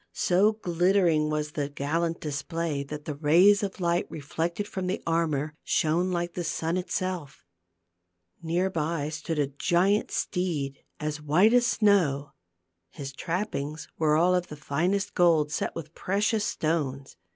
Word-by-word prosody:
So 195 +5 +3
glittering 175 -5 +2
was 150 0 -2
the 145 -2 -2
gallant 165 +4 -1
display 150 +1 -3
that 150 +2 -7
the 150 - -3
rays 170 +8 +5
of 195 -2 -4
light 175 -1 0
reflected 165 +6 -3
from 190 -3 -4
the 185 - -1
armor, 155 -3 0
shone 170 +4 +1
like 175 -1 -2
the 175 - -3
sun 165 +1 -1
itself. 185 - -3 1.0
Near 175 +3 0
by 155 -2 -1
stood 155 +1 -4
a 145 - +2
giant 175 +9 +1
steed 155 -7 -2 0.2
as 150 0 -3
white 175 +10 +4
as 245 -1 +5
snow. 170 -12 +2 0.6
His 140 +6 -7
trappings 160 -3 -3
were 155 -1 +3
all 175 +3 +4
of 180 -1 +1
the 150 - -9
finest 175 +8 -1
gold, 160 -4 +3
set - - -2
with 160 -1 -7
precious 210 +4 0
stones. 140 -4 -2
165 Hz, 145 wpm, -27 LUFS, 150-180 Hz, 1.0 s, rays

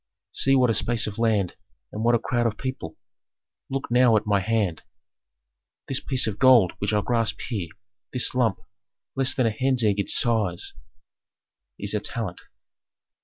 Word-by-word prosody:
See 135 0 +2
what 125 -3 +4
a - - +1
space 115 +1 0
of 105 +1 -6
land 105 -6 +1 0.4
and 110 - -4
what 120 +1 +4
a - - +4
crowd 120 +1 0
of 110 -1 -3
people; 130 - -6 0.7
look 135 -2 -4
now 120 -2 +5
at 105 - -2
my 100 -1 +2
hand. 100 -5 -1 1.1
"This 135 - -1
piece 130 -2 +1
of 105 -2 -4
gold 125 -8 +6
which 100 - -1
I 105 -1 +2
grasp 115 -1 0
here, 100 -9 -4 0.4
this - - +1
lump, - - +1 0.6
less 130 -1 +2
than 130 - +1
a 115 - +2
hen's 130 +2 0
egg 105 -2 +2
in 100 - -1
size, 110 -8 0 1.0
is - - -3
a - - +1
talent. - - -4
115 Hz, 170 wpm, -24 LUFS, 105-125 Hz, 1.1 s, gold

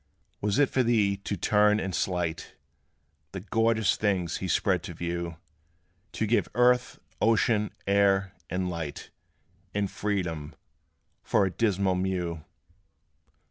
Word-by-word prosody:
Was 105 +2 0
it 145 -2 +3
for 130 - +2
thee 110 -5 +2
to 100 0 -4
turn 105 +3 +3
and 95 -3 -3
slight 85 -2 -2 0.8
The 95 - -4
glorious 110 +2 +1
things 95 -5 0
he 95 - -4
spread 95 0 +1
to 85 - -7
view 85 0 -4 0.8
To 110 - -1
give 115 +3 +1
earth, 125 0 +3 0.2
ocean, 110 -1 +3 0.2
air, 100 -1 +2 0.2
and 90 +1 -1
light, 85 -4 -5 0.6
And 100 -1 0
freedom, 90 -7 -3 0.7
for 100 - +2
a 95 - -1
dismal 100 -3 +1
mew? 90 -3 -2
100 Hz, 125 wpm, -27 LUFS, 90-105 Hz, 0.8 s, it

